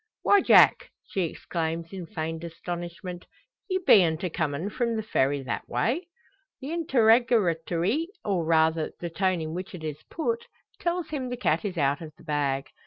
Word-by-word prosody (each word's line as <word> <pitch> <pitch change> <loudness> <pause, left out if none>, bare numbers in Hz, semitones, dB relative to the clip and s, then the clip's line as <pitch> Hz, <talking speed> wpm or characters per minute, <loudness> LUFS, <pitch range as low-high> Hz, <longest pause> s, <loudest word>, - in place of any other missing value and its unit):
"Why, 405 -1 +5
Jack!" - - +6 0.2
she 190 -3 -1
exclaims, 165 +1 -4
in 185 -3 -6
feigned 160 -3 -4
astonishment, 175 +2 -6 0.4
"ye 375 - +1
beant 180 - +4
a 180 - -1
comin' 160 +4 -2
from 235 +1 -1
the 220 - -2
Ferry 140 -8 +1
that 125 - -4
way?" 320 +10 0 0.5
The 275 +2 -6
interrogatory, 230 - +2 0.2
or 190 -5 +1
rather 160 0 +2
the 170 -1 -5
tone 185 0 0
in 155 0 -4
which 185 +2 -6
it 165 - -9
is 155 -1 -5
put, 460 +8 -2 0.3
tells 345 -2 -1
him 270 -5 -3
the 245 - -4
cat 245 - +1
is 190 -3 -3
out 140 0 +1
of 155 -2 -8
the - - -17
bag. 140 -3 -1
175 Hz, 170 wpm, -27 LUFS, 160-235 Hz, 0.5 s, Jack